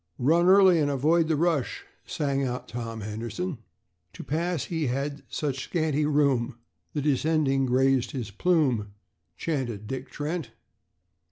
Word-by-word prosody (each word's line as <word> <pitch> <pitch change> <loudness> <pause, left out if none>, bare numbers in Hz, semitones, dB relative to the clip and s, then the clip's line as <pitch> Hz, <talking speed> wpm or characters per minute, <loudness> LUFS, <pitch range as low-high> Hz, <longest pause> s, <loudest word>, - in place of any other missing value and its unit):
"Run 165 +7 +3
early 190 -2 +7
and 145 -2 +2
avoid 155 +4 +2
the 160 - +2
rush," 160 -3 0 0.2
sang 140 -4 -1
out 125 -1 -3
Tom 115 -1 -5
Henderson. 115 - -4 0.5
"To - - -8
pass 165 +1 -1
he 160 -4 -2
had 140 +3 -2
such 135 -4 -2
scanty 155 -3 0
room, 140 -5 +1 0.4
The 145 - -2
descending 145 -2 +2
grazed 130 0 +2
his 120 -6 -5
plume," 125 - +1 0.4
chanted 125 -10 -3
Dick 130 +4 -5
Trent. 150 -4 -4
140 Hz, 135 wpm, -27 LUFS, 125-160 Hz, 0.5 s, early